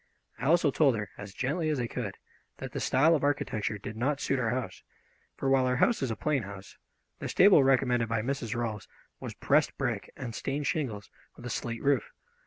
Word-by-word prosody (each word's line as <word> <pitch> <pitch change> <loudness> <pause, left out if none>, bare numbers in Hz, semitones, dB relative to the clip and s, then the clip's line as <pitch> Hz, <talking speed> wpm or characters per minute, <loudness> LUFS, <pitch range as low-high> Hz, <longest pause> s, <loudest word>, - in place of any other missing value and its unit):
I 125 - -4
also 165 -2 +4
told 135 -3 +3
her, 105 -3 -4
as 100 -1 -7
gently 150 - -1
as 150 -3 0
I 120 - 0
could, 115 -4 -5 0.4
that - - -7
the - - -4
style 150 +6 +4
of 150 - +1
architecture 110 -7 -1
did 105 +2 -7
not 135 +5 0
suit 135 - 0
our 115 -3 0
house, 125 +1 -3 0.6
for 135 - -2
while 135 -1 +4
our 125 - +1
house 230 - +2
is 135 - 0
a 110 - -2
plain 145 +2 0
house, 100 -2 -9 0.4
the - - -4
stable 190 -7 +6
recommended 125 -3 +2
by 115 -1 0
Mrs. 120 -3 -2
Rolfs 115 -4 -3 0.3
was - - -7
pressed - - +2
brick - - -2
and 120 -3 -6
stained 140 +5 -3
shingles, 120 -7 -2 0.2
with 120 - -12
a 125 - -4
slate 115 0 -4
roof. 140 -4 +2
125 Hz, 205 wpm, -29 LUFS, 115-140 Hz, 0.6 s, stable